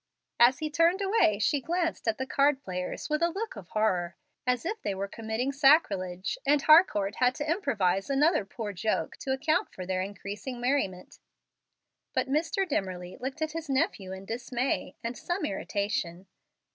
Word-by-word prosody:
As 245 +2 +6
he 310 +1 -3
turned 335 +5 +3
away, 390 - +3
she 270 +7 +1
glanced 335 -3 -2
at 225 - +1
the 260 - -2
card 275 0 +2
players 180 -1 -4
with 305 +1 0
a 340 - +3
look 415 +6 -4
of 195 -5 -10
horror, 185 -5 0 0.3
as 250 +1 +1
if 425 +5 -3
they 200 - -2
were 195 +1 -3
committing 225 +5 -3
sacrilege, 215 - +2
and 290 +1 +4
Harcourt 280 - +5
had 250 0 +3
to 295 - -4
improvise 205 - 0
another 295 - +3
poor 205 +1 -6
joke 215 +4 -1
to 265 - -4
account 295 +4 +1
for 185 - -7
their 185 0 -1
increasing 205 +5 -6
merriment. 240 -8 -1 1.0
But - - +1
Mr. 330 +8 0
Dimmerly 180 - -3
looked 265 +4 -3
at 315 - -2
his 325 -1 -6
nephew 265 - 0
in 190 +1 -7
dismay 245 +3 -2
and 230 +1 -3
some 350 +8 -2
irritation. 195 -3 -2
250 Hz, 170 wpm, -29 LUFS, 195-305 Hz, 1.0 s, As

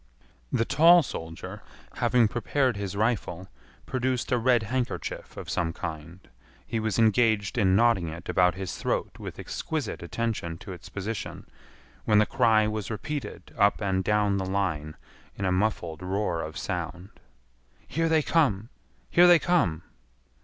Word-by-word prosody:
The 115 - +1
tall 165 +5 +6
soldier, 80 - -7 0.4
having 120 -3 +3
prepared 125 +2 0
his 100 -1 -4
rifle, 100 -4 -1 0.4
produced 130 0 -1
a 125 - +3
red 120 -1 +3
handkerchief 125 +3 -4
of - - -7
some 85 -1 -1
kind. 80 +4 -7 0.4
He 115 - -2
was 110 -3 -1
engaged 110 -2 +3
in 95 -5 +3
knotting 115 -5 +3
it 80 +2 -8
about 90 -1 +3
his 95 -3 -5
throat - - -2
with - - -7
exquisite - - -4
attention 110 -8 -3
to 95 +3 -10
its 90 - -11
position, 105 +3 -5 0.6
when 105 - +4
the 105 - +5
cry 110 -3 +3
was 110 -2 -3
repeated 115 -3 -5
up 100 0 +3
and 95 -2 0
down 105 0 +2
the 95 - -2
line 85 -6 -2 0.4
in 100 - -3
a 95 - +1
muffled 90 -4 -1
roar 95 -2 -1
of 80 0 -6
sound. 90 +1 -4 0.8
"Here 165 +1 0
they 160 -1 +3
come! 115 - +1 0.4
Here 175 +1 +7
they 175 -1 +8
come!" 100 - +1
105 Hz, 150 wpm, -27 LUFS, 90-120 Hz, 0.8 s, they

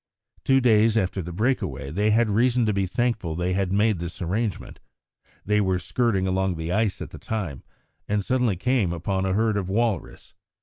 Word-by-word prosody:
Two 135 0 +4
days 115 -2 +4
after 95 -1 0
the 90 +1 -7
break 115 +9 +1
away 70 0 -5
they 105 +6 +1
had 115 +2 +3
reason 120 +3 +2
to 105 - +1
be 95 -1 0
thankful 110 -6 -1
they 90 +2 -1
had 95 -1 0
made 105 -1 +2
this 85 +2 -6
arrangement. 100 +4 -3 0.7
They 105 +1 +2
were 95 -2 +1
skirting 95 +2 0
along 95 0 0
the 80 +1 -4
ice 110 0 0
at - - -10
the - - -10
time, 95 - -4 0.5
and 105 -1 -1
suddenly 125 -5 +1
came 105 -2 +1
upon 95 +3 -2
a 95 - 0
herd 110 +1 +1
of 95 -2 -3
walrus. 110 -3 -2
100 Hz, 190 wpm, -24 LUFS, 90-115 Hz, 0.7 s, Two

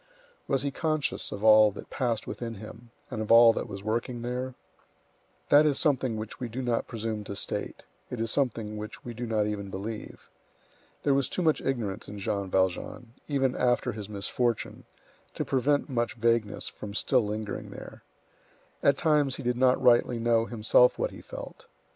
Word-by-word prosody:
Was 135 -2 +1
he 140 - -1
conscious 155 -1 -1
of 100 - -6
all 110 -1 +7
that - - -10
passed 120 -5 -1
within 115 -2 -5
him, 110 +3 -11 0.2
and 110 - -3
of 110 - -2
all 115 0 +8
that - - -3
was 100 -1 -8
working 120 +2 -2
there? 125 +1 -3 0.9
That 145 +1 +7
is 150 -3 +2
something 130 -7 +1
which 110 0 -7
we 125 - -4
do 130 +4 -4
not 120 -2 0
presume 110 -2 -4
to 100 - -6
state; - - -3 0.3
it 125 - -5
is 115 0 0
something 115 -6 -1
which 105 0 -8
we 120 - -5
do 120 +1 -5
not 110 -2 +1
even 100 -2 -4
believe. 105 +3 -7 0.8
There 140 - +3
was 135 -1 +1
too 180 - -1
much 155 -2 +2
ignorance 110 -6 -2
in 105 - -8
Jean 100 -1 -2
Valjean, 95 +6 -1
even 135 -3 +1
after 125 0 +1
his 105 -2 -7
misfortune, 105 +3 -2 0.5
to - - -2
prevent 140 +2 +1
much 120 -4 -1
vagueness 115 -2 0
from 100 -1 -8
still 125 +2 +3
lingering 105 0 -4
there. - - -10 0.8
At 140 -1 +4
times 150 -4 +2
he 140 - -7
did 125 0 0
not 130 +1 +3
rightly 120 -1 +4
know 115 0 +2
himself 115 +2 +4
what - - -1
he - - -11
felt. - - -10
115 Hz, 180 wpm, -28 LUFS, 110-130 Hz, 0.9 s, all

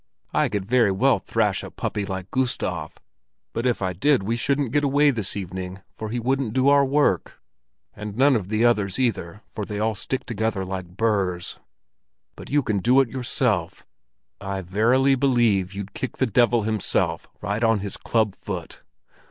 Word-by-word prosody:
"I - - +2
could 100 -2 -2
very 115 -2 +3
well 95 - +3
thrash - - 0
a - - -8
puppy 100 -1 -3
like 95 -1 -5
Gustav, 90 -11 -2 0.6
but 120 +2 -1
if 120 -5 0
I 95 0 -1
did 130 - +2
we 115 +4 -1
shouldn't 140 +1 0
get 145 +2 +2
away 145 +1 +4
this 110 -5 -3
evening, 95 0 -6
for 110 - -6
he 120 +2 -2
wouldn't 130 -1 -1
do 130 +2 +3
our 140 0 +6
work. 140 - +1 0.6
And 105 0 -7
none 135 +1 +5
of 100 -5 -2
the 110 +2 +2
others, 105 -5 +2
either, 105 -6 -1
for 105 - -4
they 105 +1 -5
all 110 +1 +1
stick 130 +5 -3
together 110 -3 -2
like 95 -1 -6
burrs. 100 -6 -1 0.8
But - - -11
you 145 0 +2
can 105 -4 0
do 125 +7 +4
it 135 -3 +3
yourself! 120 -8 -1 0.5
I 95 -1 -4
verily 115 +9 +3
believe 120 -8 +2
you'd 100 0 -6
kick 130 - -5
the 130 - +2
devil 120 0 +3
himself, 110 -2 0
right 105 +3 -2
on 115 -3 +3
his 100 -1 -4
club 110 -4 0
foot! - - -7
110 Hz, 175 wpm, -24 LUFS, 95-125 Hz, 0.8 s, our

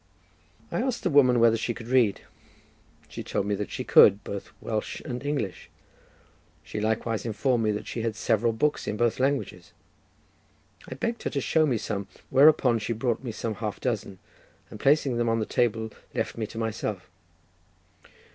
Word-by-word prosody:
I - - 0
asked 255 -1 -2
the 180 - +1
woman 130 -4 +5
whether 115 -1 +5
she 115 +1 -2
could 115 - -9
read; 120 -5 +3 0.9
she - - -7
told 100 - -2
me 105 - 0
that 100 -1 -3
she - - -4
could, 100 0 +6
both 100 -1 -6
Welsh 110 -1 -3
and 125 -3 -6
English; 145 -10 -3 0.9
she 105 - -5
likewise 110 +1 -1
informed 120 +2 0
me 105 - +2
that 105 - -5
she 115 - -4
had 110 -1 -2
several 115 +1 +1
books 145 +7 0
in 105 - -2
both 120 +1 +1
languages. 130 -10 -1 1.2
I 130 - -6
begged 230 - -3
her - - -2
to 140 - -2
show 155 +3 +2
me 125 -5 +1
some, 100 -2 -4 0.2
whereupon 135 -4 +5
she 115 - -2
brought 115 +1 -1
me 120 - -4
some 110 0 -3
half 105 -1 -5
dozen, 110 -6 -3 0.5
and 105 - -9
placing 140 -2 +3
them 120 -1 +1
on 115 - +2
the 110 - -1
table, 110 -2 0 0.2
left - - -2
me 110 -2 -3
to 110 - -11
myself. 110 -4 -3
115 Hz, 175 wpm, -26 LUFS, 110-130 Hz, 1.2 s, could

